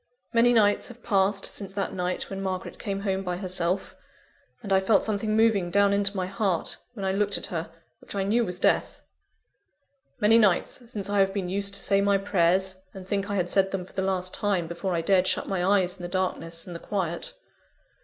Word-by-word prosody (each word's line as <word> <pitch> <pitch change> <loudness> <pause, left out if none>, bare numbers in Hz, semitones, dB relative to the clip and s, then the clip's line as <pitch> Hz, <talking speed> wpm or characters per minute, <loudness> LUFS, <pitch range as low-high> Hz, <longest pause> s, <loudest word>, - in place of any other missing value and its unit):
"Many 235 +1 +5
nights 210 -3 +3
have 240 -1 -13
passed 195 -2 +1
since 195 -2 -2
that 195 -1 -2
night 180 0 -2
when 195 0 -4
Margaret 185 -1 -4
came 195 -1 -3
home 195 -1 -1
by 180 -1 -3
herself 185 0 -1 0.7
and 200 -2 -1
I 190 - +5
felt 195 +1 +3
something 215 0 0
moving 220 -5 +3
down 200 +2 +3
into 200 0 +1
my 185 - -1
heart, 190 -2 -1 0.2
when 200 -5 -5
I 190 - +1
looked 200 +1 +2
at - - -2
her, 165 -1 -3 0.3
which - - -10
I 195 - 0
knew 225 +5 +2
was 180 -4 -4
death - - +1 1.2
many 225 +1 +5
nights, 220 +4 +1
since 205 -4 -3
I 205 0 0
have 195 0 +2
been 190 -3 -2
used 200 +1 +1
to - - +2
say 195 0 +2
my 200 0 +3
prayers, 190 -1 +1 0.2
and 185 -1 -9
think 200 +1 -2
I 205 - -1
had 180 -3 0
said 195 +1 +3
them 195 -2 -4
for - - -18
the 190 - -2
last 185 -1 -1
time, 200 -5 0
before 170 +2 -3
I 165 - 0
dared 185 +2 +3
shut - - 0
my 190 -2 -1
eyes 185 -1 +2
in - - -12
the 175 - -4
darkness 175 -3 -2
and 175 - -8
the - - -6
quiet. 195 - -3
195 Hz, 215 wpm, -26 LUFS, 185-205 Hz, 1.2 s, Many